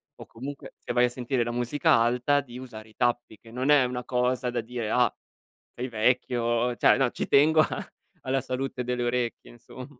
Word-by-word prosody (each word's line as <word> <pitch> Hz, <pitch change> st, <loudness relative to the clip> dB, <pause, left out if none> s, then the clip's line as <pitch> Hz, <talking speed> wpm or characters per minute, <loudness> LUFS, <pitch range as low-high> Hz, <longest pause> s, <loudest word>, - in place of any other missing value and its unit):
o -, -, -11 dB
comunque 140 Hz, +4 st, -9 dB
se -, -, -6 dB
vai 120 Hz, 0 st, +4 dB
a -, -, 0 dB
sentire 125 Hz, 0 st, -1 dB
la 120 Hz, -, -3 dB
musica 120 Hz, +4 st, +1 dB
alta, 125 Hz, +5 st, +2 dB
di 125 Hz, -2 st, -11 dB
usare 110 Hz, -4 st, -10 dB
i 110 Hz, -, -22 dB
tappi 120 Hz, -3 st, -1 dB
che 115 Hz, -, -17 dB
non 130 Hz, +4 st, -2 dB
è 145 Hz, -4 st, +6 dB
una 125 Hz, 0 st, -4 dB
cosa 125 Hz, 0 st, 0 dB
da 120 Hz, 0 st, -2 dB
dire: 115 Hz, -1 st, -4 dB
"Ah 125 Hz, 0 st, +3 dB, 0.6 s
sei 125 Hz, +2 st, -4 dB
vecchio", 120 Hz, +1 st, +1 dB
cioè, -, -, +4 dB
no, 135 Hz, -3 st, +1 dB
ci -, -, -4 dB
tengo 155 Hz, +3 st, +5 dB
a -, -, -2 dB, 0.3 s
alla 130 Hz, 0 st, -1 dB
salute 130 Hz, -1 st, -4 dB
delle 125 Hz, 0 st, -2 dB
orecchie, 120 Hz, -1 st, -2 dB
insomm 120 Hz, +2 st, -11 dB
125 Hz, 200 wpm, -26 LUFS, 120-130 Hz, 0.6 s, è